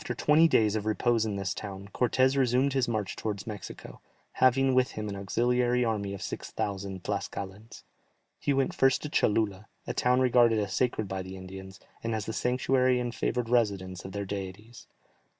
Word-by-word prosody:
After 155 - -4
twenty 155 +2 +5
days 110 -8 +3
of 110 0 -2
repose 110 +1 +1
in 105 - -2
this 95 -2 -2
town, 100 -1 -7
Cortès 130 +2 +2
resumed 130 +1 +2
his 135 -2 +1
march 110 -4 -2
towards 105 -2 -4
Mexico, 105 - -8 0.3
having 130 +1 +3
with 130 0 +2
him 105 0 -4
an 100 - -4
auxiliary 120 +5 +1
army 100 -3 -2
of 95 - -7
six - - -5
thousand 95 -2 -4
Tlascalans. 100 +3 -5 0.6
He - - 0
went 135 -1 +1
first 135 0 +3
to 150 - -4
Cholula, 105 -5 +1 0.2
a - - -3
town 125 +1 +2
regarded 120 -3 +4
as 100 -3 -1
sacred 115 -3 0
by 95 0 -3
the 95 +1 -8
Indians, 95 +1 -10 0.2
and 115 -1 -1
as 110 -2 -3
the 110 - -4
sanctuary 125 +1 +2
and 120 -1 -3
favoured 125 0 -1
residence 100 -6 0
of 95 - -7
their 100 +1 -4
deities. 100 +4 -7
110 Hz, 185 wpm, -29 LUFS, 100-125 Hz, 0.6 s, twenty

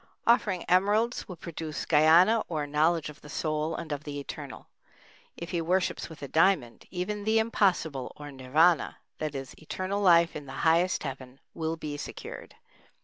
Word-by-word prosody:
Offering 205 -6 +2
emeralds 205 +6 +2
will 180 - -7
produce 160 -1 -6
Gyana 170 +8 +5
or 155 -3 -2
Knowledge 155 +2 +1
of 150 - -18
the 150 - -13
Soul 155 +1 -2
and 165 -2 -6
of 145 0 -3
the 145 -1 -5
Eternal. 140 - -8 0.7
If 170 - -7
he 170 - 0
worships 180 +2 0
with 155 -3 -11
a - - -4
diamond, 160 -6 +2
even 200 +3 -3
the 220 +2 +2
impossible, 185 - +1
or 145 -1 -9
Nirvâna, 145 +6 +2 0.2
that 155 -2 -3
is 135 -1 -6
Eternal 185 +5 -3
Life 170 -3 +5
in 150 -2 -7
the 135 - -8
highest 170 +3 +3
Heaven, 130 -2 -7
will 160 0 -2
be 150 -2 -6
secured. - - -8
160 Hz, 165 wpm, -28 LUFS, 150-185 Hz, 0.7 s, Gyana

